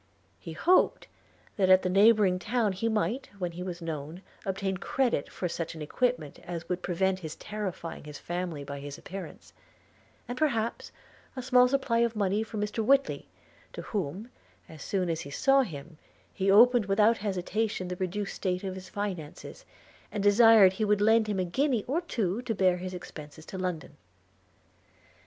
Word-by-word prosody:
He - - -8
hoped 365 +1 +3 0.5
that 190 -2 +2
at 185 0 +6
the - - 0
neighbouring 200 -1 +4
town 225 +1 0
he 225 +5 -1
might, 225 +4 -1
when 180 -3 -3
he 170 +2 -8
was 180 -2 -5
known, 160 +2 -6 0.2
obtain 195 0 -1
credit 240 - 0
for 180 - -3
such 165 -1 -4
an 160 - -6
equipment 240 - -1
as 170 -1 -7
would 180 0 -2
prevent 185 +2 0
his 160 -4 -7
terrifying 195 -7 -6
his 150 -1 -8
family 175 -4 -4
by 140 0 -6
his 145 0 -7
appearance; 195 0 -9 0.7
and, 245 +1 -5
perhaps, 235 -7 -1 0.4
a 255 - -5
small 250 -1 +5
supply 255 -3 +1
of 235 -1 +1
money 205 0 +1
from 220 -1 -4
Mr 210 +2 -2
Whitly, 275 +4 +2 0.5
to - - -7
whom, 200 - -4 0.4
as 160 -2 -12
soon 185 +2 -1
as 165 -1 -2
he 140 - -8
saw 270 - +3
him, 160 - -7 0.3
he 195 0 0
opened 235 +2 +6
without 210 +3 +3
hesitation 200 0 -2
the 180 - -4
reduced 195 +2 -3
state 185 0 -2
of 190 -1 -3
his 185 0 -9
finances, 185 -8 -6 0.5
and 205 -2 -3
desired 205 -2 +7
he 215 - -2
would 210 -1 +2
lend 220 +1 +4
him 205 -2 -1
a 185 - +1
guinea 250 - 0
or 305 +7 0
two 225 - -2
to 240 -3 -3
bear 185 -2 +3
his 185 +1 -6
expences 155 -3 -10
to - - -9
London. 180 -5 -4
195 Hz, 175 wpm, -28 LUFS, 180-225 Hz, 0.7 s, desired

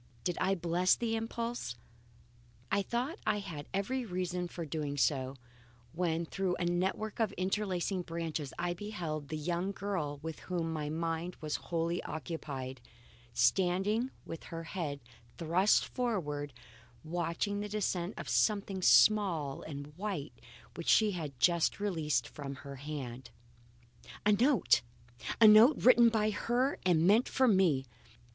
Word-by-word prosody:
Did 175 - -1
I 190 +1 +2
bless 175 +1 +2
the 230 -1 -1
impulse? 230 - -3 1.0
I 200 - +3
thought 245 - -2
I - - +3
had 170 -8 -6
every 245 +7 -1
reason 180 -3 -2
for 170 -1 -6
doing 145 -1 -3
so, 130 0 +1 0.6
when 170 -1 0
through 185 +1 -1
a 175 - -2
network 190 +6 -1
of 220 -2 +2
interlacing 185 -1 -1
branches 165 -4 -4
I 175 0 -1
beheld 170 -6 -5
the 155 +1 -4
young 175 +5 -1
girl 185 -8 -3
with 160 -1 -5
whom 170 -3 -3
my 150 -2 -3
mind 165 +2 -2
was 155 -1 -3
wholly 170 0 0
occupied, 140 -5 -6 0.5
standing 190 - +2 0.2
with 165 - -8
her 165 0 -6
head 160 -5 -4 0.4
thrust 175 +5 +3
forward, 150 - -2 0.5
watching 170 +5 -2
the 210 0 -4
descent 195 -3 -1
of - - -6
something 190 - +1
small 155 - +4
and 145 0 -8
white 185 -10 -4 0.4
which 170 - -4
she 215 -2 +5
had 150 -8 -5
just 170 +3 +3
released 165 -7 0
from 140 -2 -7
her 140 -1 -7
hand. 130 -4 -6 1.0
A 210 - +5
note! 245 +5 +4 0.6
A 225 - +9
note 220 +7 +8
written 240 -1 +6
by 215 -1 +1
her 245 +6 0
and 165 -2 +4
meant 215 +6 +4
for 260 -1 +3
me! 180 - +3
175 Hz, 140 wpm, -32 LUFS, 155-205 Hz, 1.0 s, A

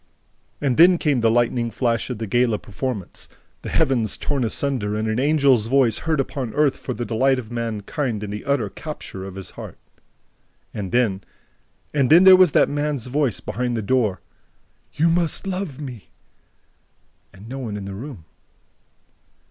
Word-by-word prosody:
And 135 -4 0
then 175 +2 +7
came 145 -7 +1
the 115 - +4
lightning 120 0 +1
flash 115 +1 -1
of 125 - -4
the 110 - -4
gala 120 +1 +1
performance: 105 -1 -6 0.3
the - - -6
heavens 130 -8 +1
torn 140 -3 -1
asunder 115 -3 -1
and 110 +1 -2
an 110 +2 -1
angel's 140 -5 +3
voice 125 -3 +2
heard 155 -3 +2
upon 130 -4 -3
earth 150 -2 +3
for 125 - -6
the 120 - -4
delight 130 +4 +2
of 120 -3 -7
mankind 115 0 -3
and 105 -1 -5
the 105 - -6
utter 140 -6 0
capture 100 -4 -8
of 95 -1 -8
his 95 -2 -7
heart. - - -10 1.0
And 95 -3 -5
then... 110 -6 +1 0.7
and 140 -4 +2
then 170 +4 +7
there 190 0 +10
was 185 -4 +5
that - - +5
man's 145 -3 -2
voice 135 -3 -1
behind 120 +1 -2
the 110 - -3
door 110 -3 +1 0.7
"You 165 +2 +3
must 170 +2 0
love 185 -7 -4
me!" 125 -8 -8 1.2
and 95 +3 -14
no 135 +3 -6
one 110 -5 -4
in 100 - -6
the 100 - -6
room... 110 - -9
125 Hz, 170 wpm, -22 LUFS, 110-140 Hz, 1.2 s, there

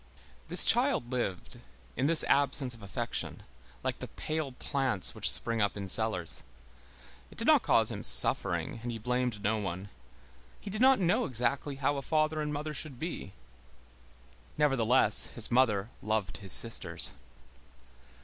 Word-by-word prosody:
This - - +8
child 245 - +2
lived, 120 -8 -5 0.4
in 130 +3 -1
this 165 0 +5
absence 140 -2 +1
of 115 - -12
affection, 100 -2 -6 0.4
like - - -4
the - - -7
pale 155 -3 -5
plants 130 - -1
which - - +3
spring 115 -1 -1
up 100 0 -1
in 100 -1 -6
cellars. 95 -4 +3 0.9
It - - -18
did - - -3
not - - +4
cause - - +2
him - - -7
suffering, - - +5
and 120 +1 -5
he 115 - -6
blamed 125 -2 -3
no 110 +1 -1
one. 95 0 -6 0.7
He 200 - -9
did 215 +3 -4
not 265 0 +5
know 180 -2 0
exactly 130 +3 -3
how 140 +1 -2
a - - -4
father 155 +2 -1
and 150 0 -4
mother 150 +1 -5
should 140 -2 -4
be. 155 - -7 1.2
Nevertheless, 130 -6 +2
his 115 -1 -2
mother 115 -4 +1
loved 105 -2 -3
his 95 -2 -8
sisters. 115 +5 0
125 Hz, 150 wpm, -29 LUFS, 110-150 Hz, 1.2 s, This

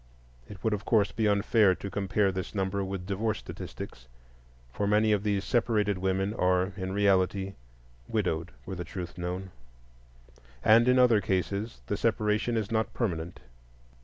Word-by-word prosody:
It 100 -2 -11
would 110 - +1
of 105 -1 -3
course 105 -3 +2
be 110 +1 0
unfair 100 -1 +4
to 100 - -7
compare 100 0 +1
this 95 +2 -5
number 95 0 -1
with 95 -1 -4
divorce 105 +3 -1
statistics, 65 0 -8 0.7
for 100 - -1
many 105 +1 +3
of 105 -2 +2
these 100 -1 0
separated 105 -5 +1
women 95 +2 0
are 90 -1 +1
in 95 -1 -4
reality 95 -1 +2 0.5
widowed, 80 +2 -1 0.2
were 95 - -5
the 90 -1 -4
truth 90 -1 -7
known, 90 +2 -4 1.1
and 115 +3 +6
in 125 0 +5
other 120 -4 +5
cases 100 +4 -2
the 105 - -2
separation 110 +1 +1
is 110 -1 -2
not 110 0 0
permanent. 85 - -3
100 Hz, 155 wpm, -29 LUFS, 95-105 Hz, 1.1 s, and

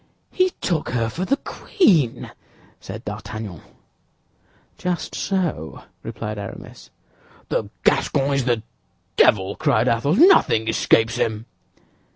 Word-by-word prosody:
"He 370 0 +2
took 170 -5 -1
her 115 -2 -1
for 175 +11 -4
the 275 +7 +1
queen!" 165 - +1 0.5
said - - -9
D'Artagnan. 100 -5 -7 1.1
"Just 180 -2 -3
so," 170 - -3 0.2
replied 105 -1 -6
Aramis. - - -10 0.6
"The - - -1
Gascon 140 +1 +2
is 135 -2 0
the 120 -3 0 0.5
devil!" 95 -1 +3
cried 110 +3 +1
Athos; 125 +7 +1
"nothing 315 - +5
escapes 115 +1 +2
him." 110 -2 -1
115 Hz, 110 wpm, -22 LUFS, 110-170 Hz, 1.1 s, nothing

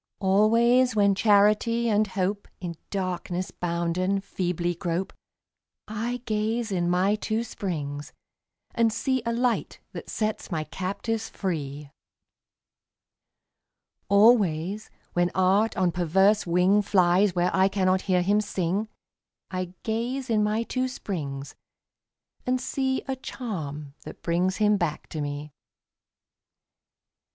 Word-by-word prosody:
Always 230 +6 +4
when 200 -1 +4
Charity 215 +3 +3
and 215 -1 +2
Hope, 195 +1 -2
In 175 -2 -4 0.2
darkness 185 -1 -3
bounden, 175 +3 -1
feebly 175 -2 -2
grope, 175 +2 -3 0.7
I 230 +3 -3
gaze 220 +1 -1
in 175 -2 0
my 185 +3 +3
two 220 +1 -1
springs 150 -10 -5 0.6
and 230 -1 +3
see 260 +3 0
A - - +1
Light 240 0 0
that - - -8
sets 215 -1 -2
my 160 -4 -2
captives 200 +7 -3
free. 145 -6 -4 2.2
Always, 200 -2 +3 0.2
when 175 0 +2
Art 195 +4 +3
on 185 -2 +2
perverse 190 +4 +3
wing 180 +4 +4
Flies 185 -1 +3
where 180 +1 +1
I 190 0 +5
cannot 190 -1 +1
hear 180 -2 +1
him 205 +3 +3
sing, 195 +1 -1 0.6
I 185 -1 -4
gaze 240 +3 -2
in 215 -1 +3
my 215 +2 +1
two 255 +2 -1
springs 145 - -5 0.9
and 255 0 0
see 265 0 -1
A 265 - -1
charm 155 - -6
that - - -11
brings 180 +3 +1
him 210 -1 +3
back 165 -5 -2
to 155 - -4
me. 145 +1 -5
195 Hz, 120 wpm, -26 LUFS, 175-220 Hz, 2.2 s, I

